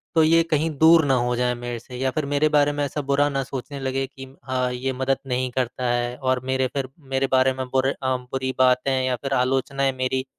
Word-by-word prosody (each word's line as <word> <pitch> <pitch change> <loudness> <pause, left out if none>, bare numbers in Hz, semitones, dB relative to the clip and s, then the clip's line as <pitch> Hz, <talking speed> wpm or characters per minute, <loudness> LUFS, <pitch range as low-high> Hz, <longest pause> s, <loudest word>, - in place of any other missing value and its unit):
तो 160 - +5
ये 165 +1 +5
कहीं 155 +1 +2
दूर 160 +1 +6
न 140 - +1
हो 125 -1 +1
जाए 125 0 +1
मेरे 120 0 -5
से 125 +2 -12
या 130 +1 0
फिर 155 +2 -2
मेरे 145 +2 +1
बारे 145 -1 +3
में 145 0 -2
ऐसा 145 +1 -3
बुरा 145 +1 +3
न 135 -1 -1
सोचने 135 +2 -6
लगे 135 0 -1
कि 135 0 -11 0.2
हाँ, 130 -1 -1
ये 130 +2 -2
मदद 130 +1 0
नहीं 130 0 -1
करता 125 0 -2
है। 120 0 -1
और 130 -1 0
मेरे 130 0 +1
फिर 135 -2 -3 0.2
मेरे 135 0 +2
बारे 130 0 +4
में 130 0 -4
बुरे 130 +1 +1
अ, 130 -2 -2
बुरी 130 +1 -4
बातें 125 +1 +3
या 130 -1 0
फिर 135 +3 -4
आलोचनाएँ 135 +1 +1
मेरी 130 0 -1
130 Hz, 230 wpm, -23 LUFS, 125-140 Hz, 0.2 s, दूर